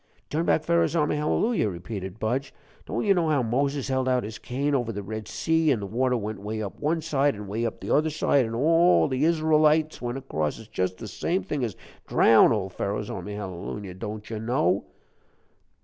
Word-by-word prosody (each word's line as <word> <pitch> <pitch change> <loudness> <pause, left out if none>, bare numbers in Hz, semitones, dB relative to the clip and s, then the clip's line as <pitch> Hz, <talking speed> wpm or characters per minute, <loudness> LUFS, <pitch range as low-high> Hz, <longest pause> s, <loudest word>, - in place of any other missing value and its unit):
"TurnbackPharo'sarmyhallelujah," 160 - +1
repeated 95 +1 -6
Budge. 130 +5 -2 0.3
"Don't - - -2
you 200 - +5
know 170 -4 +1
how 145 -4 +2
Moses 140 +4 0
held 130 -1 0
out 125 -1 +2
his 110 +1 -7
cane 140 +4 -2
over 120 -4 0
the 100 -2 -5
Red 110 +2 -6
Sea, 160 -2 +1
an' 125 - +1
the 100 - -4
water 125 +5 0
went 105 -2 -5
way 110 +2 -4
up 100 -3 -5
one 160 +2 0
side, 140 -2 +1
an' 105 0 -7
way 110 +4 -1
up 110 - -6
the - - -1
other 155 +2 +3
side, 145 -3 +2
and 115 -1 -4
all 165 +7 +4
the 130 0 -1
Isrulites 155 -1 +3
went 120 +1 -3
across? 80 - -2
It's 110 - -12
just 95 -3 -2
the 110 - -7
same 175 - -1
thing 145 -3 -3
as 110 -5 -2 0.3
_drown_oldPharo'sarmyhallelujah 100 -2 +1
don't 105 0 -6
you 110 -2 -5
know?" 105 -5 +1
125 Hz, 175 wpm, -26 LUFS, 105-150 Hz, 0.3 s, you